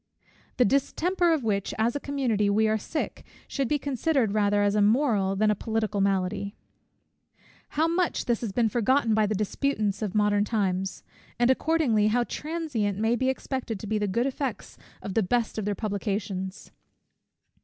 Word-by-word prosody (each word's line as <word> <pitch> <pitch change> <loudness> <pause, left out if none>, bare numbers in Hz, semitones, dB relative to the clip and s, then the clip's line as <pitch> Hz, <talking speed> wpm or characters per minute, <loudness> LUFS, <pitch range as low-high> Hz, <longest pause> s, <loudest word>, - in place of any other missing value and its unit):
The 250 - +5
distemper 340 - +1
of 315 -5 +1
which, 200 -3 -1
as 230 +3 +1
a - - -1
community, 250 -8 0
we 215 +2 +3
are 215 0 +1
sick, 305 +8 -4 0.2
should 275 -3 -1
be 295 - +1
considered 275 -4 0
rather 205 -1 +2
as 205 0 +2
a 210 - +2
moral 210 -3 +2
than 210 +2 +3
a - - +1
political 220 -1 -1
malady. 195 +1 0 1.2
How 320 +2 +4
much 340 +1 0
has 235 -2 +1
this 230 -4 -4
been 230 +3 +2
forgotten 235 +2 +2
by 215 -1 +3
the 215 - -1
disputants 210 0 -1
of 210 -2 -3
modern 205 -1 +3
times! 195 -4 -1 0.3
and 240 +1 +4
accordingly, 260 -8 +2
how 240 +3 +2
transient 290 - -3
may 225 +3 +2
be 260 +2 +1
expected 260 -4 -3
to - - -7
be 215 +1 -1
the 205 - 0
good 235 +6 0
effects 270 -3 -4 0.3
of 195 - -4
the 225 - +3
best 225 +3 0
of 210 - -3
their 205 0 -1
publications! 200 -2 -3
220 Hz, 175 wpm, -27 LUFS, 205-260 Hz, 1.2 s, The